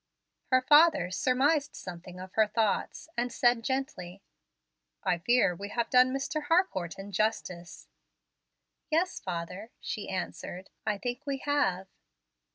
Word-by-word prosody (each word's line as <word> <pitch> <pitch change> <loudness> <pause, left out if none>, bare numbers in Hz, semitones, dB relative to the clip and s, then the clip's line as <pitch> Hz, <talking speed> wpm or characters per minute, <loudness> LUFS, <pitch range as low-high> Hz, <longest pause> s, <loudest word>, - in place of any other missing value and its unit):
Her 255 -1 +3
father 300 - +5
surmised 275 +8 +2
something 180 0 -9
of 185 0 -9
her 220 -1 +4
thoughts 220 +5 -1
and 245 +1 -1
said 240 -1 +3
gently, 225 -9 -3 0.8
"I 180 -3 +1
fear 195 -1 +3
we 200 +3 -7
have 235 +2 -2
done 255 0 +6
Mr. 280 +3 -2
Harcourt 255 - +1
injustice." 195 -3 -3 1.0
"Yes, 335 +4 +1
father," 180 +4 -5
she 210 - -5
answered, 185 0 -5 0.2
"I 210 -1 +1
think 245 +7 -5
we 275 -1 -1
have." 195 -11 +1
220 Hz, 125 wpm, -29 LUFS, 185-270 Hz, 1.0 s, done